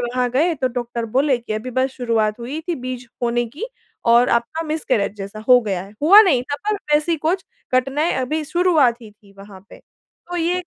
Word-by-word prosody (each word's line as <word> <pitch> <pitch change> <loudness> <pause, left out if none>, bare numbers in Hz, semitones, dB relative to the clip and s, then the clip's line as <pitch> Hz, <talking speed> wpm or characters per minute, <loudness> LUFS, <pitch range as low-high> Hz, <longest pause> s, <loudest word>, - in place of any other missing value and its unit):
वहाँ 245 +1 -1
गए 315 +7 +2
तो 260 -3 -1
डॉक्टर 240 -1 -3
बोले 275 0 +3
कि 235 -2 -6
अभी 215 +4 -4
बस 260 +1 +1
शुरुआत 230 -4 -1
हुई 265 +7 -5
थी 345 - +1
बीज 255 -2 -6 0.2
होने 240 0 +1
की 290 - -7 0.4
और 235 +1 +5
आपका 235 +7 0
मिसकैरेज 255 -10 -1
जैसा 200 +1 -7
हो 250 - +8
गया 195 -6 -3
है। 195 +2 -13
हुआ 395 +8 +9
नहीं 280 - +2
था 285 +2 -4
पर 425 - +2 0.2
वैसी 305 +3 +2
कुछ 340 +5 -1 0.3
घटनाएँ 270 +6 +1
अभी 305 +5 -1
शुरुआत 305 -8 +2
ही 220 - -11
थी 205 -1 -23
वहाँ 195 -1 -12
पे। - - -13
तो 355 0 -12
ये 345 +1 0
एक 360 - -7
255 Hz, 210 wpm, -20 LUFS, 235-310 Hz, 0.4 s, हुआ